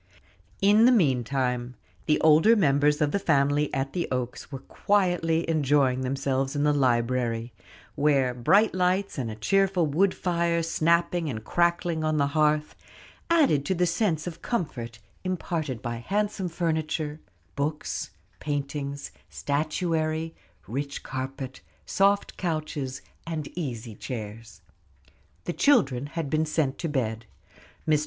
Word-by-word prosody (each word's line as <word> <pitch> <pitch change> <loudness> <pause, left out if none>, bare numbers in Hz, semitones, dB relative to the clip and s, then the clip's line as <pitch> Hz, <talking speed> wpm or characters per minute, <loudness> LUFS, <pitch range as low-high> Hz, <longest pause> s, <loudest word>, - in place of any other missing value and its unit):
In 210 +3 +6
the 250 - +7
meantime, 130 - +1 0.3
the 150 - +3
older 160 +9 +6
members 150 -4 +3
of 145 -1 +2
the 200 - 0
family 145 -4 +2
at 135 -1 -2
the 175 - -1
Oaks 125 +2 -4
were 135 - -4
quietly 175 -5 +1
enjoying 140 -4 +2
themselves 135 +1 -1
in 145 - +1
the 150 0 +3
library, 120 -3 0 0.4
where 140 -4 +2
bright 195 - +3
lights, 185 -1 0
and 120 -3 -2
a 110 - -5
cheerful 190 - +2
wood 180 +6 +2
fire 170 -2 0
snapping 170 0 +1
and 110 -4 -5
crackling 170 - +1
on 155 0 +1
the 140 - +3
hearth, 150 -1 +2 0.6
added 290 - +4
to 190 - 0
the 180 +1 +2
sense 165 -3 0
of 175 -2 -7
comfort 120 - -3 0.3
imparted 165 - -3
by 120 -1 -3
handsome 200 - -1
furniture, 160 -2 -2 0.4
books, 150 +2 -3 0.3
painting, 140 -1 -3 0.3
statuary, 160 +2 -1 0.3
rich 140 +4 -4
carpet, 130 0 -5 0.2
soft 200 +1 +1
couches, 155 -6 -3 0.2
and 155 -3 -5
easy 120 -9 -4
chairs. 110 -1 -7 0.8
The 175 - -3
children 140 - +3
had 165 0 -4
been 155 +2 0
sent 150 -3 0
to 165 - -2
bed. 115 -5 -2 0.6
Mr. 155 -1 +4
150 Hz, 130 wpm, -26 LUFS, 135-170 Hz, 0.8 s, the